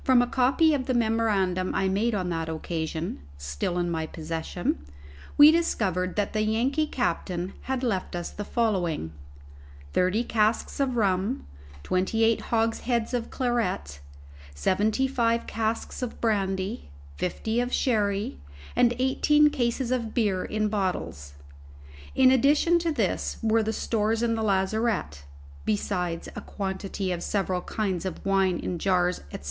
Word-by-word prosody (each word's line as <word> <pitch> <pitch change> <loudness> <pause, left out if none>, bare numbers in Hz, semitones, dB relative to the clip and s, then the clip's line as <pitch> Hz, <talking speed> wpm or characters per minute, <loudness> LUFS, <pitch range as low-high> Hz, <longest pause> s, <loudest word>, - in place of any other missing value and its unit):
From 255 -2 +5
a - - -2
copy 270 +6 +3
of 265 -3 -1
the 255 - +1
memorandum 210 -6 +1
I 195 - +1
made 210 +4 +1
on 185 -3 -1
that 165 -1 -2
occasion 160 - -3 0.2
(still 70 - -3
in 175 -1 0
my 160 -1 -2
possession), 160 - -3 0.5
we 295 +1 +10
discovered 185 - 0
that 205 -1 -1
the 215 - +1
Yankee 245 +8 +1
captain 185 -9 -2 0.2
had 265 -1 -1
left 195 -7 -1
us 175 -1 -4
the 205 - -5
following: 185 - 0 0.8
thirty 185 +6 +2
casks 220 +1 0
of 265 -3 +1
rum, 200 +3 0 0.4
twenty 190 +5 +1
eight 225 0 +3
hogsheads 230 +1 0
of 240 -2 -1
claret, 220 - -1 0.6
seventy 210 - +1
five 235 -3 +1
casks 225 +2 -2
of 250 -2 -4
brandy, 195 - -1 0.3
fifty 220 +5 -1
of 245 0 -1
sherry, 205 - 0 0.4
and 240 -1 +4
eighteen 295 +3 +4
cases 245 -2 -1
of 235 -4 -2
beer 200 -6 +1
in 215 0 -1
bottles. 85 - -3 0.8
In 260 -1 +6
addition 290 +6 +4
to 335 -1 0
this 225 -10 -1
were 225 0 +3
the 220 0 -1
stores 225 0 0
in 230 -1 +2
the 225 - -1
lazarette 195 - 0 0.4
(besides 170 - -1
a - - -5
quantity 190 -1 -4
of 175 -1 -2
several 190 -3 -1
kinds 190 -5 -2
of 190 -1 -5
wine 195 -2 +2
in 175 - -4
jars, 180 -1 +1
&c.) - - -5
210 Hz, 145 wpm, -26 LUFS, 180-240 Hz, 0.8 s, we